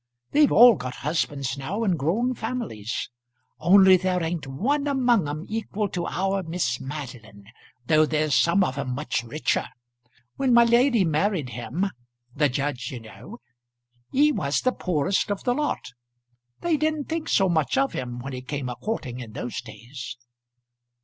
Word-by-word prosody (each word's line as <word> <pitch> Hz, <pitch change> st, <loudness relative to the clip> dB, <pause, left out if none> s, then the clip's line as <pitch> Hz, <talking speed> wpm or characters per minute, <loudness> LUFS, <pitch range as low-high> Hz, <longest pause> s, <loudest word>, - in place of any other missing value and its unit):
They've 295 Hz, -1 st, +4 dB
all 240 Hz, +1 st, +9 dB
got 125 Hz, -1 st, -6 dB
husbands 140 Hz, -3 st, -1 dB
now 195 Hz, +12 st, -3 dB
and 190 Hz, -5 st, +2 dB
grown 200 Hz, -, 0 dB
families 220 Hz, -, -4 dB, 0.5 s
only 190 Hz, +2 st, +7 dB
there 180 Hz, -1 st, 0 dB
ain't 165 Hz, -3 st, -3 dB
one 275 Hz, -, -1 dB
among 245 Hz, -, +2 dB
'em 155 Hz, +4 st, -5 dB
equal 215 Hz, -1 st, -3 dB
to 175 Hz, -1 st, -3 dB
our 195 Hz, +2 st, -1 dB
Miss 160 Hz, -8 st, -2 dB
Madeline, 125 Hz, -7 st, -8 dB, 0.4 s
though 155 Hz, +3 st, +4 dB
there's 155 Hz, -1 st, 0 dB
some 170 Hz, +7 st, +4 dB
of 135 Hz, -5 st, -2 dB
'em 125 Hz, -2 st, -3 dB
much 150 Hz, -4 st, -2 dB
richer. 120 Hz, +7 st, -1 dB, 0.7 s
When 260 Hz, -3 st, +3 dB
my 235 Hz, -, +8 dB
lady 235 Hz, -2 st, +4 dB
married 160 Hz, -2 st, 0 dB
him, 125 Hz, -, -3 dB, 0.5 s
the 145 Hz, +1 st, +2 dB
judge, 130 Hz, -2 st, -2 dB
you 125 Hz, -, -6 dB
know, 110 Hz, +1 st, -12 dB, 0.7 s
he 295 Hz, +3 st, +4 dB
was 140 Hz, -, 0 dB
the 255 Hz, -, +2 dB
poorest 180 Hz, -, 0 dB
of 205 Hz, -1 st, -3 dB
the 245 Hz, -, +2 dB
lot. 295 Hz, -, -2 dB, 0.7 s
They 335 Hz, -3 st, +1 dB
didn't 310 Hz, -1 st, 0 dB
think 325 Hz, 0 st, -3 dB
so 195 Hz, -, +3 dB
much 160 Hz, -, +1 dB
of 270 Hz, 0 st, +1 dB
him 120 Hz, -1 st, -4 dB
when 135 Hz, +2 st, -6 dB
he 125 Hz, -, -5 dB
came 130 Hz, 0 st, -4 dB
a 125 Hz, -, -4 dB
courting 130 Hz, -, -4 dB
in 115 Hz, -4 st, -9 dB
those 120 Hz, -, -4 dB
days." 120 Hz, +3 st, -9 dB
160 Hz, 165 wpm, -25 LUFS, -, 0.7 s, all